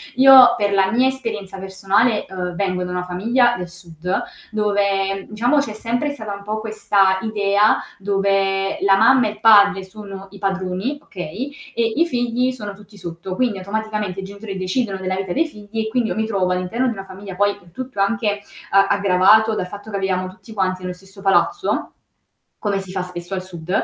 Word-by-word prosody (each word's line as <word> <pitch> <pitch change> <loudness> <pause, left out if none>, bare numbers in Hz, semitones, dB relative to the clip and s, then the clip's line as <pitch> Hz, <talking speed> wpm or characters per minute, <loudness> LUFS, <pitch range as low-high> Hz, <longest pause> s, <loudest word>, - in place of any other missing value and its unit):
Io 260 -2 +9
per 205 -3 0
la 195 -1 +3
mia 250 +3 +3
esperienza 220 -7 -4
personale, 195 +4 +1
uhm, 180 -2 -4
vengo 185 -2 -1
da 180 - -5
una 180 0 -2
famiglia 235 +7 +2
del 180 -1 -5
sud 175 0 -4 0.3
dove 200 -2 0
diciamo 240 +7 +1
c'è 235 -7 0
sempre 240 +6 -2
stata 220 -7 -6
un 200 - -11
po' 215 +1 -3
questa 200 -3 +2
idea 205 -1 +2 0.2
dove 195 -1 0
la 195 0 +5
mamma 260 +3 +5
e - - -2
il 210 - -13
padre 200 -3 +6
sono 195 -1 -10
i 200 - -12
padroni, 195 +7 -2
okay, 200 - -6 0.2
e 230 -1 0
i 335 - +3
figli 245 -2 0
sono 205 -1 -5
tutti 205 +1 -16
sotto. 175 +1 -6
Quindi 240 -6 0
automaticamente 210 -1 -3
i - - -5
genitori 200 0 -7
decidono 195 +2 -1
della 190 0 -2
vita 190 -2 -4
dei 325 +3 +2
figli 210 -4 -8
e 220 - -1
quindi 235 0 0
io - - -2
mi 220 - 0
trovo 195 -4 0
all'interno 185 +8 -1
di - - +1
una 195 - -7
famiglia, 190 0 -9
poi 205 +1 +1
tutto 255 -1 -7
anche 205 -1 0 0.3
a 195 0 +5
aggravato 200 +3 +4
dal 180 - -2
fatto 205 +3 -10
che 200 - -2
viviamo 185 -1 -1
tutti 190 +4 -13
quanti 185 -2 -1
nello 180 0 -4
stesso 195 +2 -15
palazzo, 295 - +1 0.7
come 200 -2 -1
si 190 -1 -7
fa 185 -1 -2
spesso 180 0 -7
al 185 -1 -2
sud 175 -2 -11
200 Hz, 190 wpm, -20 LUFS, 190-220 Hz, 0.7 s, Io